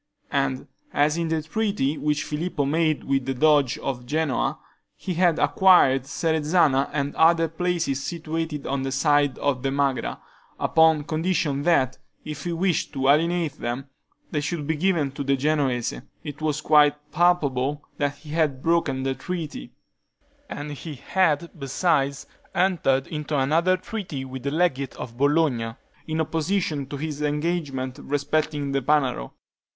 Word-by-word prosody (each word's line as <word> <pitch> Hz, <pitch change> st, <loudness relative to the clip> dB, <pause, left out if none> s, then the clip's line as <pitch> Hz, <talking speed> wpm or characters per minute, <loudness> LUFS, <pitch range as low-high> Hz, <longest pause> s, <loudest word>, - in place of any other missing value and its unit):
And 65 Hz, -1 st, 0 dB, 0.3 s
as 150 Hz, +1 st, +3 dB
in 170 Hz, -1 st, -1 dB
the 160 Hz, -1 st, -1 dB
treaty 200 Hz, -5 st, -1 dB
which 150 Hz, -1 st, 0 dB
Filippo 150 Hz, -1 st, -2 dB
made 155 Hz, +1 st, +1 dB
with 135 Hz, -1 st, 0 dB
the 135 Hz, -, -1 dB
Doge 145 Hz, -2 st, +3 dB
of 125 Hz, -3 st, -4 dB
Genoa, 155 Hz, -1 st, 0 dB, 0.4 s
he 185 Hz, -, -4 dB
had 175 Hz, -1 st, +3 dB
acquired 135 Hz, -9 st, +4 dB
Serezana 155 Hz, -2 st, +2 dB
and 140 Hz, -1 st, -2 dB
other 165 Hz, 0 st, +4 dB
places 165 Hz, -4 st, -1 dB
situated 160 Hz, -2 st, -4 dB
on 135 Hz, 0 st, -1 dB
this 135 Hz, 0 st, -2 dB
side 145 Hz, -1 st, +3 dB
the 135 Hz, -1 st, -1 dB
Magra, 140 Hz, -2 st, -1 dB, 0.4 s
upon 160 Hz, -2 st, +4 dB
condition 155 Hz, -2 st, 0 dB
that, 140 Hz, -6 st, +2 dB, 0.3 s
if 150 Hz, -2 st, -6 dB
he 175 Hz, -, -1 dB
wished 170 Hz, -1 st, 0 dB
to 135 Hz, -1 st, +1 dB
alienate 165 Hz, 0 st, +2 dB
them, 125 Hz, +4 st, -4 dB, 0.4 s
they 150 Hz, -, 0 dB
should 155 Hz, 0 st, -3 dB
be 160 Hz, +2 st, 0 dB
given 160 Hz, -4 st, +1 dB
to 140 Hz, -, -5 dB
the 140 Hz, 0 st, +2 dB
Genoese, 135 Hz, -4 st, 0 dB, 0.3 s
it 150 Hz, -1 st, -7 dB
was 155 Hz, -1 st, -1 dB
quite 150 Hz, -1 st, +3 dB
palpable 150 Hz, -4 st, +1 dB
that 145 Hz, -1 st, -1 dB
he 150 Hz, +1 st, -12 dB
had 150 Hz, -5 st, 0 dB
broken 160 Hz, -6 st, +1 dB
the 135 Hz, 0 st, 0 dB
treaty; 160 Hz, -, -6 dB, 0.8 s
and 145 Hz, +1 st, -5 dB
he 150 Hz, +1 st, -7 dB
had, 170 Hz, +3 st, +1 dB
besides, 140 Hz, 0 st, 0 dB, 0.3 s
entered 175 Hz, -8 st, +2 dB
into 150 Hz, -1 st, -3 dB
another 165 Hz, +7 st, +2 dB
treaty 185 Hz, -9 st, -5 dB
with 130 Hz, 0 st, -7 dB
the 140 Hz, -, -2 dB
legate 140 Hz, -4 st, 0 dB
of 115 Hz, -, -7 dB
Bologna, 140 Hz, -6 st, +2 dB, 0.3 s
in 160 Hz, 0 st, -2 dB
opposition 160 Hz, -3 st, -1 dB
to 145 Hz, -, -6 dB
his 150 Hz, 0 st, -4 dB
engagement 150 Hz, -4 st, -2 dB
respecting 145 Hz, 0 st, -1 dB
the 135 Hz, 0 st, 0 dB
Panaro. 130 Hz, -, 0 dB
150 Hz, 145 wpm, -24 LUFS, 135-165 Hz, 0.8 s, acquired